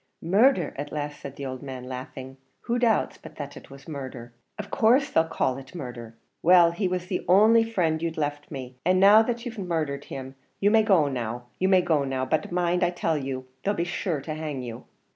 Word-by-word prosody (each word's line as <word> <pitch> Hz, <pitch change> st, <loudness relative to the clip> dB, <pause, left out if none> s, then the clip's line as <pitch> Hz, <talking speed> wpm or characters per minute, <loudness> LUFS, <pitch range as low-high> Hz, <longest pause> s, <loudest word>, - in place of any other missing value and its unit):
"Murdher," 195 Hz, -, +3 dB
at 145 Hz, +1 st, -5 dB
last 150 Hz, -1 st, -4 dB
said 140 Hz, -1 st, -8 dB
the 140 Hz, -, -6 dB
old 130 Hz, -1 st, -5 dB
man, 130 Hz, -2 st, -7 dB
laughing; 130 Hz, +1 st, -8 dB, 0.2 s
"who 240 Hz, +1 st, -1 dB
doubts 230 Hz, -3 st, +1 dB
but -, -, -12 dB
that 145 Hz, -1 st, -7 dB
it -, -, -12 dB
was 140 Hz, 0 st, -13 dB
murdher? 130 Hz, -5 st, -7 dB, 0.2 s
in 210 Hz, -, -5 dB
course 245 Hz, +7 st, +3 dB
they'll 160 Hz, -, +4 dB
call 130 Hz, -5 st, -1 dB
it 135 Hz, +4 st, -13 dB
murdher. 120 Hz, -7 st, -7 dB, 0.3 s
Well, 175 Hz, 0 st, +6 dB
he 185 Hz, +3 st, -1 dB
was 180 Hz, 0 st, -2 dB
the 180 Hz, 0 st, -3 dB
only 220 Hz, +5 st, +6 dB
frind 175 Hz, -8 st, 0 dB
you'd 165 Hz, -1 st, -3 dB
left 145 Hz, -1 st, -3 dB
me, 130 Hz, -3 st, -7 dB
and 185 Hz, +2 st, +3 dB
now 205 Hz, +3 st, +8 dB
that 235 Hz, +1 st, -2 dB
you've 240 Hz, -2 st, -6 dB
murdhered 155 Hz, -6 st, -2 dB
him, 130 Hz, 0 st, -7 dB, 0.3 s
you 205 Hz, +1 st, +3 dB
may 225 Hz, 0 st, +6 dB
go 190 Hz, -9 st, +4 dB
now; 120 Hz, -3 st, -3 dB, 0.2 s
you 190 Hz, -, +2 dB
may 185 Hz, -2 st, +5 dB
go 160 Hz, -5 st, +2 dB
now 135 Hz, -1 st, -2 dB
but 155 Hz, +5 st, -1 dB
mind 175 Hz, 0 st, +1 dB
I 175 Hz, -, +3 dB
tell 175 Hz, -2 st, -1 dB
you, 130 Hz, -1 st, -4 dB, 0.2 s
they'll 205 Hz, +1 st, 0 dB
be 170 Hz, -, 0 dB
sure 175 Hz, -3 st, -2 dB
to 155 Hz, +3 st, -5 dB
hang 150 Hz, -4 st, -4 dB
you." 115 Hz, -2 st, -8 dB
160 Hz, 220 wpm, -26 LUFS, 135-185 Hz, 0.3 s, now